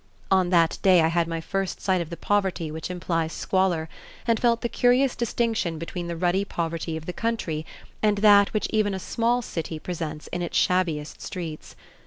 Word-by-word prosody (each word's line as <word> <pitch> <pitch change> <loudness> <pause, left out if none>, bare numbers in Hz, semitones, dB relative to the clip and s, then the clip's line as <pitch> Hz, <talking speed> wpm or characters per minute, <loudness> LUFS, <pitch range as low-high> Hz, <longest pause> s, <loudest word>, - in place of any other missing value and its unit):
On 185 -2 +4
that 170 -2 +3
day 185 -3 +6
I 160 - +3
had 170 0 +1
my 165 0 -3
first 195 +3 -3
sight 185 -2 +1
of 165 - -5
the 170 - -6
poverty 190 -6 0
which 160 +2 -5
implies 165 -2 -2
squalor, 185 -4 0 0.4
and 230 -2 +2
felt 235 -1 +2
the - - 0
curious 250 +2 +3
distinction 225 -7 -1
between 170 +2 -5
the 170 -1 -4
ruddy 180 +3 +1
poverty 165 -3 -3
of 160 - -9
the 180 - -4
country 175 -10 -2 0.3
and 210 -1 +3
that 200 -1 +6
which 215 - 0
even 210 -3 +1
a - - -4
small 235 +5 0
city 165 -5 -4
presents 155 -2 -5
in 175 - -3
its 175 - -2
shabbiest 165 -5 0
streets. 165 -4 -6
180 Hz, 190 wpm, -25 LUFS, 165-205 Hz, 0.4 s, day